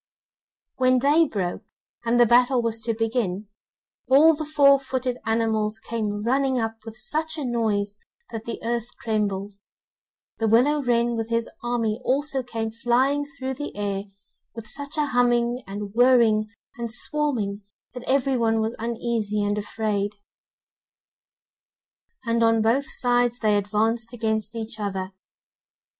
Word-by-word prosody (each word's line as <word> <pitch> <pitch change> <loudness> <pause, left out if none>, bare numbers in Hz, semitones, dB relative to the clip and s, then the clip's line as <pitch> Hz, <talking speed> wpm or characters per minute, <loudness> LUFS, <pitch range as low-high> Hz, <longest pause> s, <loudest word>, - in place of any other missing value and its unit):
When 255 0 +4
day 295 +5 +4
broke, 185 -8 -3 0.4
and 235 +1 +2
the 240 - +7
battle 245 +2 +4
was 230 -1 -1
to 230 0 -1
begin, 220 -3 -2 0.6
all 290 +5 +7
the 310 0 -4
four 280 -2 +5
footed 255 -2 -3
animals 220 -1 0
came 215 -2 -3
running 265 +2 +1
up 225 -1 -2
with 220 -1 -9
such 315 +7 -1
a 295 - -3
noise 210 -4 -1 0.3
that 225 -1 -6
the 235 - -5
earth 235 0 -1
trembled. 205 -3 -2 0.9
The 225 - +1
willow 265 +7 +4
wren 240 -2 +1
with 225 0 -3
his 230 0 0
army 235 -1 -1
also 275 +1 0
came 225 -2 -4
flying 255 +5 +1
through 265 -4 -5
the 290 +3 -6
air 200 -1 -2 0.5
with 230 -1 -7
such 285 +6 -5
a 300 - +2
humming, 245 -2 +1
and 200 0 -6
whirring, 235 -3 +4 0.3
and 235 -1 -3
swarming 240 -6 -1 0.3
that 250 - -7
every 270 0 +2
one 225 -1 +2
was 220 +2 -1
uneasy 225 -2 -1
and 205 0 0
afraid, 210 -1 -2 2.1
and 230 0 +1
on 225 -1 +4
both 265 +7 +1
sides 245 -3 +1
they 215 -3 +2
advanced 220 +3 0
against 220 -2 -2
each 220 0 -5
other. 190 -2 -3
230 Hz, 140 wpm, -24 LUFS, 215-255 Hz, 2.1 s, the